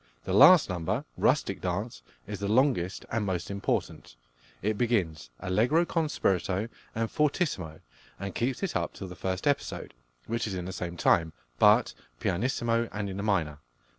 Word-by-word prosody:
The 95 - -3
last 170 - +8
number, 85 -3 -2
"Rustic - - +1
Dance," - - -3 0.2
is - - -6
the 100 - -2
longest 110 -5 +1
and 110 -1 0
most 95 -1 -2
important. 100 -10 -3 0.5
It 110 +1 +1
begins 90 - 0
allegro 125 - +2
con 165 -2 0
spirito 95 -1 0 0.3
and 115 0 0
fortissimo, 145 - -1 0.4
and 100 -1 -5
keeps 130 +9 -1
it 190 - -2
up - - -1
till 95 - -7
the 90 - -9
first 95 +2 -3
episode, 145 -1 -1 0.3
which 115 0 -2
is 100 - -3
in 90 -1 -4
the 95 - -5
same 85 -1 -5
time, 80 -2 +3 0.3
but - - +5 0.3
pianissimo 115 +3 0
and 100 -1 -3
in 95 - -6
the - - -3
minor. 85 -8 0
100 Hz, 165 wpm, -28 LUFS, 90-120 Hz, 0.5 s, last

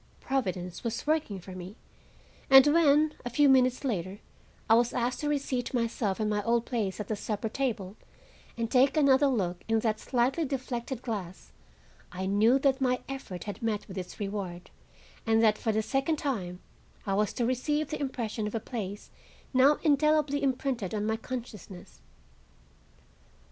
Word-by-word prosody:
Providence 185 -9 -3
was 230 -1 -3
working 305 -10 0
for 185 +1 -11
me, 185 +2 -8 0.7
and 270 0 +9
when, 300 0 +4
a 245 - -3
few 285 +4 +4
minutes 255 -1 +4
later, 195 -7 -2 0.5
I 220 - +5
was 235 +1 +3
asked 245 +1 -1
to 295 - -1
reseat 270 -4 -2
myself 230 -4 -1
in 215 - 0
my 210 -1 0
old 235 +2 +1
place 215 -6 -2
at 210 - -4
the 215 - -1
supper 215 +1 -3
table 215 -7 -3 0.6
and 230 -1 -2
take 265 +4 +4
another 280 -1 +5
look 185 -9 -1
in 225 0 +2
that 220 -1 0
slightly 255 +6 0
deflected 255 -3 -4
glass, 195 -7 -6 0.6
I 185 +1 -4
knew 215 +6 +4
that 275 0 +1
my 255 -1 +1
effort 265 -10 -6
had 205 -2 -7
met 215 -2 -2
with 190 - -9
its 180 -2 -7
reward, 195 -4 -5 0.6
and 225 0 +4
that 215 -1 +4
for 225 - 0
the 220 0 0
second 270 +7 0
time 185 -12 -3 0.4
I 195 - -1
was 210 0 +1
to 240 - -1
receive 295 +5 0
the 305 - -3
impression 230 -5 -3
of 210 - -5
a - - 0
place 205 -4 -6 0.4
now 270 +3 +5
indelibly 300 -1 +3
imprinted 255 -6 -1
on 210 0 -1
my 220 +1 +1
consciousness. 225 -6 -8
235 Hz, 165 wpm, -29 LUFS, 205-270 Hz, 0.7 s, and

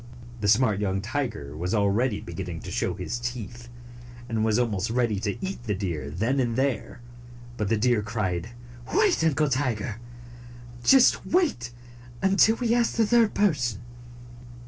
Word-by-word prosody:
The 100 - -1
smart 105 -1 +3
young 95 -2 -1
tiger 105 - -4
was 90 +6 -2
already 105 +2 +1
beginning 85 0 -6
to - - -8
show - - -1
his 120 +2 -4
teeth, 120 0 -6 0.6
and 110 -2 -1
was 110 0 +2
almost 110 -4 0
ready 115 -3 0
to 100 0 -3
eat 190 -10 -6
the 105 -3 -1
deer 85 -8 -4
then 110 - -1
and 120 -3 0
there, 130 -2 -2 0.5
but 105 -4 -2
the 115 - +2
deer 120 0 +2
cried, 105 -4 -3 0.5
"Wait, 410 - +3
Uncle 155 -1 +2
Tiger! 125 -5 -1 0.9
Just 260 - +5
wait 300 - 0 0.5
until 195 - +4
we 235 -1 0
ask 240 -1 +1
the 230 - +3
third 230 0 +3
person. 130 - +1
115 Hz, 150 wpm, -26 LUFS, 105-140 Hz, 0.9 s, Just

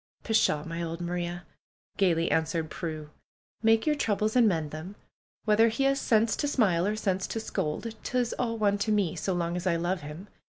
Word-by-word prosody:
"Pshaw! 215 -9 +2
My 165 +1 -5
old 165 0 -4
Maria!" 175 0 -3 0.5
gaily 170 -4 +2
answered 160 0 0
Prue. 155 -3 -5 0.5
"Make 225 0 +4
your 305 - +3
troubles 215 -4 0
and 240 -3 +6
mend 160 -6 0
them. 160 +6 -7 0.5
Whether 220 +1 +5
he 230 +4 0
has 275 0 +2
sense 220 -1 +3
to 290 - 0
smile, 195 -10 +2
or 210 - 0
sense 190 -3 -1
to 225 - -3
scold, 220 +1 -3
'tis 245 -1 -1
all 230 -2 -1
one 205 -2 +2
to 215 +2 0
me, 200 -6 +1
so 190 - -1
long 170 -1 -1
as 180 +1 -3
I 170 - +3
love 175 +2 -1
him. 150 +7 -8
190 Hz, 195 wpm, -28 LUFS, 170-220 Hz, 0.5 s, and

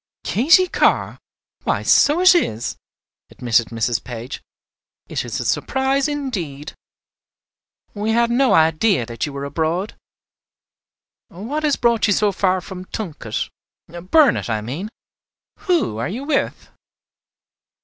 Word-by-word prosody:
"Katy 325 - +4
Carr! - - +1 0.4
why, - - -1
so 305 +5 +4
it 370 0 +7
is," 115 - -1 0.5
admitted 115 -2 +1
Mrs. 115 0 -2
Page. 120 +2 -7 0.7
"It - - -3
is - - -4
a - - -4
surprise 270 +1 0
indeed. 185 - -4 1.2
We 210 +1 -3
had 235 +1 +2
no 255 +2 +3
idea 160 - +3
that 115 +1 -4
you - - -6
were 140 0 -5
abroad. 165 +7 -2 1.3
What 230 - -5
has 300 -2 +2
brought 235 -2 +2
you 205 - +3
so 210 +1 +2
far 185 -1 0
from 185 0 -9
Tunket, 160 - -5 0.6
Burnet, 310 - +4
I 110 -2 -1
mean? 145 - -5 0.8
Who 330 - +1
are 115 - -2
you 235 +8 -5
with?" 285 -1 -2
195 Hz, 125 wpm, -20 LUFS, -, 1.3 s, it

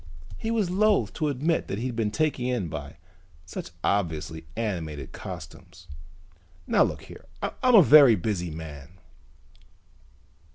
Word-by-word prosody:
He 225 - -3
was 215 -6 0
loathe 210 +2 +2
to 155 - -1
admit 150 +4 0
that 95 - -3
he'd 120 +2 -3
been 110 -2 0
taken 150 +1 -1
in 120 -9 -1
by 75 0 -7 0.5
such 90 - -7
obviously 80 -4 -1
animated 80 - -4
costumes. 90 0 -10 0.8
"Now - - +2
look - - +1
here, - - -13 0.2
I'm 255 -1 +2
a 200 - +9
very 140 -5 +8
busy 90 -2 -2
man." 80 0 -9
105 Hz, 130 wpm, -26 LUFS, -, 0.8 s, a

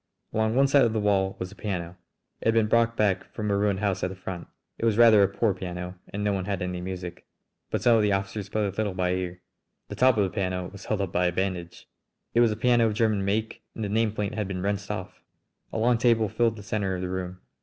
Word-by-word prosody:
Along 110 +1 +1
one 135 +1 +5
side 140 0 +5
of 115 - +2
the 110 - 0
wall 95 -2 +1
was 90 0 -5
a - - -13
piano. 90 -4 -4 0.5
It - - -1
had 115 - +4
been 115 -1 +4
brought 115 +1 +2
back 95 -3 +2
from 105 -2 -2
a - - +2
ruined 100 -1 +1
house 100 -3 0
at 90 - +1
the 95 - -7
front. 90 -1 -7 0.3
It - - -5
was 110 -2 +2
rather 115 -3 +7
a 100 - +5
poor 100 +2 0
piano 90 -1 -6 0.2
and 105 +1 -4
no 105 -1 +1
one 95 -2 -2
had 100 -2 -2
any 90 -1 -3
music, 90 -1 -6 0.4
but - - -2
some 120 -2 +6
of - - +3
the 105 -1 +2
officers 95 +1 -2
played 110 -1 0
a - - -19
little 105 -3 -1
by 90 -1 0
ear. 90 -1 -3 0.5
The - - -5
top 130 -2 +4
of 105 - +4
the 95 - -1
piano 90 -1 -2
was 100 -1 -11
held 105 -2 -1
up 95 -3 -2
by 90 0 +2
a - - +1
bandage! 90 -2 -3 0.5
It 115 - +3
was 120 -2 +5
a 105 - -3
piano 120 0 +4
of 105 - -2
German 110 -3 +2
make, 110 +3 -1
and 110 - -4
the 105 - -2
nameplate 105 -1 0
had 105 -3 -2
been 90 -2 -4
wrenched 100 0 -2
off! 95 -3 -5 0.5
A - - -3
long 120 +1 +3
table 115 -3 +3
filled 115 +1 +1
the 105 - -10
centre 100 -3 -1
of 90 - -4
the - - -2
room. 90 0 -4
100 Hz, 260 wpm, -26 LUFS, 95-110 Hz, 0.5 s, rather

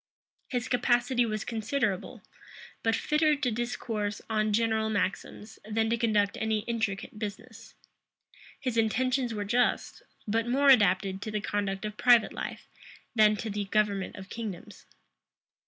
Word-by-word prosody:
His 250 -1 -2
capacity 245 -1 +2
was 215 -1 -3
considerable; 220 -3 -2 0.6
but 225 0 +2
fitter 305 0 +2
to 280 -4 -1
discourse 220 -3 -3
on 215 -1 +1
general 220 0 +1
maxims, 205 +1 -3
than 220 +1 0
to 235 - +2
conduct 215 -3 +1
any 220 -1 +1
intricate 220 -2 -3
business: 220 +2 -8 0.8
his 255 -4 -2
intentions 250 +3 +1
were 210 -2 -3
just; 245 +4 0 0.3
but 225 +2 0
more 275 +3 +4
adapted 195 -5 +4
to 215 - -4
the 215 0 -2
conduct 200 -1 -2
of 210 0 -5
private 240 -3 +5
life - - -6 0.5
than 215 -2 +5
to 220 +1 -4
the 205 0 -2
government 200 -1 0
of 190 -1 -9
kingdoms. 210 -5 -7
220 Hz, 140 wpm, -29 LUFS, 205-240 Hz, 0.8 s, private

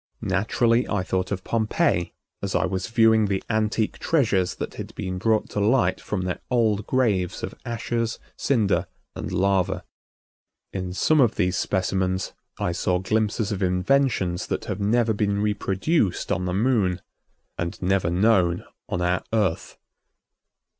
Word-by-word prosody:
Naturally 115 +5 +1
I 100 -3 0
thought 95 0 -2
of 95 -2 -3
Pompeii 110 - +1 0.3
as - - -2
I - - +2
was 95 +1 -2
viewing 115 -1 +4
the 100 -1 -1
antique 110 0 0
treasures 105 - +1
that - - -5
had - - -8
been 90 0 -4
brought 110 +2 +2
to - - -2
light 120 +5 +2
from 100 -3 -3
their 90 -1 -2
old 110 -4 +1
graves 105 -9 +1
of - - -4
ashes, 115 0 -2 0.2
cinder 100 -9 +1 0.3
and - - -5
lava. 95 -1 +1 0.9
In 95 -2 -3
some 155 +10 +3
of 120 -3 +3
these 90 -2 +1
specimens 95 0 -1 0.2
I 90 - -1
saw 90 +1 0
glimpses 110 +3 0
of 100 -1 -3
inventions 90 0 +1
that - - -3
have 95 - -4
never 110 +2 +2
been 100 -1 0
reproduced 105 - 0
on 90 - 0
the 90 - -1
Moon 100 -5 +1 0.6
and 85 +3 -3
never 95 -1 +1
known 90 -2 +2 0.2
on 90 - -1
our 90 +1 +1
Earth. 105 -7 0
100 Hz, 145 wpm, -24 LUFS, 90-115 Hz, 0.9 s, viewing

